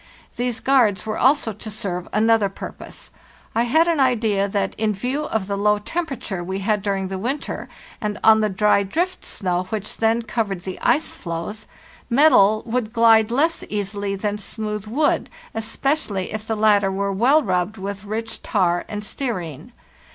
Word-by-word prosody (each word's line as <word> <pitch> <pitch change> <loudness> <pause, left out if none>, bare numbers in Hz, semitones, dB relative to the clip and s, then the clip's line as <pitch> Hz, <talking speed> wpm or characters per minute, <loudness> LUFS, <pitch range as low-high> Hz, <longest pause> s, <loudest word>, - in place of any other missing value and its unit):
These 245 -1 -2
guards 230 -8 +3
were 215 0 -3
also 265 -4 +3
to 215 +2 -8
serve 180 -4 -4
another 220 -1 +3
purpose. 195 - -10 0.4
I 230 +1 +2
had 315 +8 +3
an 335 -3 +1
idea 220 -6 +2
that, 195 -1 -1
in 215 -1 +1
view 255 +9 -2
of 220 -3 -1
the 200 +1 -2
low 210 +1 +3
temperature 240 - -4
we 190 +2 -3
had 205 +1 0
during 195 -2 -1
the 190 -1 -4
winter, 265 +8 -3 0.3
and 210 -1 -2
on 220 0 +6
the 215 - +2
dry 205 +1 +3
drift 350 - -2
snow 180 -2 -2
which 210 +1 -5
then 225 +1 +2
covered 210 -5 -2
the 185 - -6
ice 310 - +1
floes, 170 +6 -5 0.4
metal 225 -6 +5
would 235 -1 -2
glide 225 -2 +5
less 315 +7 +1
easily 200 -1 -2
than 205 +1 -2
smooth 210 0 -5
wood, 290 +7 +1 0.2
especially 225 - -1
if 215 0 -5
the 225 - 0
latter 205 -2 +4
were 200 +1 -1
well 265 +10 +4
rubbed 185 +1 -1
with 195 0 -5
rich 225 +2 -4
tar 175 -4 +1
and 210 -1 -5
stearine. 185 - -5
215 Hz, 165 wpm, -22 LUFS, 195-235 Hz, 0.4 s, on